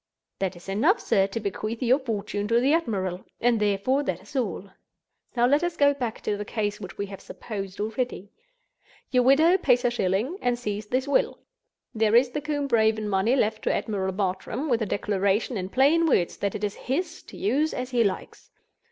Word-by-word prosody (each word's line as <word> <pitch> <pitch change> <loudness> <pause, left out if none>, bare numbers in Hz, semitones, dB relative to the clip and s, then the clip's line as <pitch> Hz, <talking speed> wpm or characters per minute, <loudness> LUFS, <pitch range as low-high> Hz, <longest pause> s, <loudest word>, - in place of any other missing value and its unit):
"That 190 -1 -1
is 175 - -14
enough, 265 - +2
sir, 195 0 +2
to 200 +3 -4
bequeath 215 +3 -3
your 255 +3 +4
fortune 210 -5 -3
to 230 +2 +3
the 270 +5 +3
admiral; 195 - -1 0.2
and 235 -1 +2
therefore 210 +7 +1
that 180 -6 -2
is 205 - -16
all. 200 -6 -2 0.7
Now 240 0 +4
let 290 +6 +3
us 345 -1 -2
go 285 0 +5
back 245 -5 -4
to 210 - -1
the 205 - -4
case 210 -1 -3
which 190 -1 -8
we 200 - -2
have 195 -1 -9
supposed 195 -4 -7
already. 220 -1 -3 0.8
Your 250 -1 +4
widow 315 +9 +5
pays 250 -6 +3
her 245 - +2
shilling, 230 - -1
and 245 -1 +1
sees 210 -3 -4
this 255 +4 -1
will. 280 - +1 0.6
There 220 0 +2
is 245 +1 +5
the 295 - -3
Combe 290 -1 -2
Raven 220 -2 +2
money 205 +5 +2
left 220 -4 0
to - - +2
Admiral 190 -3 -2
Bartram, 205 +9 -2
with 235 -2 +2
a 220 - 0
declaration 200 +4 0
in 185 -2 -3
plain 295 +8 +4
words 175 - +2
that 200 -1 -2
it 210 - -5
is 205 -1 -1
his, 330 +6 -3
to - - -13
use 310 -5 +1
as 255 0 -4
he 240 -2 +3
likes. 195 -3 -4
225 Hz, 200 wpm, -26 LUFS, 200-265 Hz, 0.8 s, go